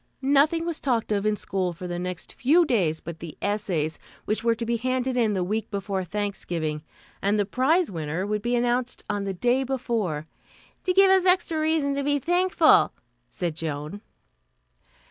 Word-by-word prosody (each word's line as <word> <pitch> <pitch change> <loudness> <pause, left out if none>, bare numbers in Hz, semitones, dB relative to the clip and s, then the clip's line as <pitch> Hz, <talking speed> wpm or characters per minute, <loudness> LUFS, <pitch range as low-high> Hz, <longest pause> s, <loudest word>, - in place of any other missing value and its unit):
Nothing 290 +5 +3
was 340 -2 -3
talked 240 -5 0
of 205 0 +1
in 215 - +2
school 185 -3 -2
for 175 +2 -9
the 175 0 -3
next 180 -1 -5
few 325 +7 +4
days 180 - +1
but 165 0 -8
the 165 -3 -8
essays, 185 -7 -1 0.3
which 215 +1 -1
were 230 -1 +3
to 230 - -4
be 235 0 0
handed 255 +1 -1
in 225 -4 +2
the 185 -2 0
week 215 +4 -2
before 195 -2 -2
Thanksgiving, 175 -5 -3 0.4
and 200 +2 +2
the 205 - +2
prize 280 - +2
winner 165 +2 -3
would 210 0 -1
be 240 +3 0
announced 245 +1 0
on 205 -1 -2
the 195 - -2
day 245 +7 +2
before 230 - -2 0.6
"to 365 - +2
give 385 +1 +6
us 380 -1 +4
extra 360 -3 +3
reason 310 -2 +1
to 280 0 -1
be 290 +1 +2
thankful," 350 +1 +4 0.4
said 170 +1 -3
Joan. 155 +4 -5
215 Hz, 180 wpm, -25 LUFS, 180-275 Hz, 0.6 s, give